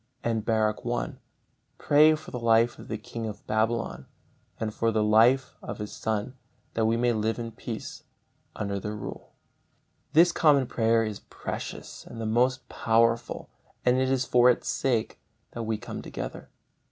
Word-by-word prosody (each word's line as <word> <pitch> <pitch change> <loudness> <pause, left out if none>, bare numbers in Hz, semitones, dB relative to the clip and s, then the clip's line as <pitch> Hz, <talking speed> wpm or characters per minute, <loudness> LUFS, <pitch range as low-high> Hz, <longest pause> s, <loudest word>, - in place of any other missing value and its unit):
And 115 -2 0
Baruch 110 -1 +1
i: 120 0 -2 0.6
"Pray 155 +2 +5
for 155 - -11
the 125 - -4
life 115 0 +3
of - - -11
the 110 - -3
king 115 +1 -6
of 105 -2 -8
Babylon 110 +2 -1 0.5
and 110 -1 -2
for 115 - +1
the 110 -1 +1
life 115 +5 +4
of - - -6
his 105 -1 -6
son, 110 +3 -2 0.4
that 110 -1 +1
we 115 +1 +2
may 120 0 +2
live 110 0 0
in 115 -1 -5
peace - - -7 0.5
under 100 -1 -2
their 105 +2 -4
rule." 105 - -8 0.8
This 170 +3 +6
common 145 -6 +4
prayer 115 -1 +2
is 110 -2 -4
precious - - -7
and 115 - -9
the 115 - -3
most 120 +3 +1
powerful, 115 0 +1 0.3
and 125 0 +4
it 130 0 +2
is 130 -1 +1
for 125 0 +5
its 125 - +1
sake 120 -5 0 0.3
that 115 -2 -5
we 110 -1 0
come 120 - -7
together. - - -7
115 Hz, 165 wpm, -27 LUFS, 110-125 Hz, 0.8 s, This